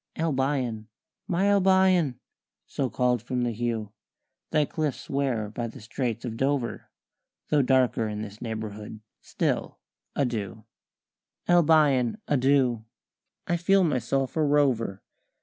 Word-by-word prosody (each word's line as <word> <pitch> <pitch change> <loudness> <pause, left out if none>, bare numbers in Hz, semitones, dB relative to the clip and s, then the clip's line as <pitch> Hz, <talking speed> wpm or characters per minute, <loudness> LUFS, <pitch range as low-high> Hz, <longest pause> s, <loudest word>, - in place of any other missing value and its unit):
"Albion! 130 -7 -1 0.4
My 180 +2 +1
Albion! 190 -8 +3 0.5
So 135 -2 -2
called 125 -2 +1
from 125 +1 -2
the 120 - 0
hue 115 -2 -3 0.6
Thy 150 -2 +2
cliffs 155 -2 -3
wear 130 -6 0
by 115 +2 -3
the 115 - -10
Straits 120 +1 -3
of 115 -2 -5
Dover 135 -2 -1 0.6
Though 150 -1 +4
darker 125 -4 +2
in 105 0 -4
this 105 0 -10
neighbourhood 110 -2 -6 0.2
still - - -2 0.4
adieu! 115 -5 -2 0.8
Albion, 150 -8 +4
adieu! 130 -4 +2 0.6
I 175 - 0
feel 190 +3 +3
myself 135 -3 0
a 160 - +1
rover. 135 -9 +1
130 Hz, 115 wpm, -26 LUFS, 115-150 Hz, 0.8 s, Though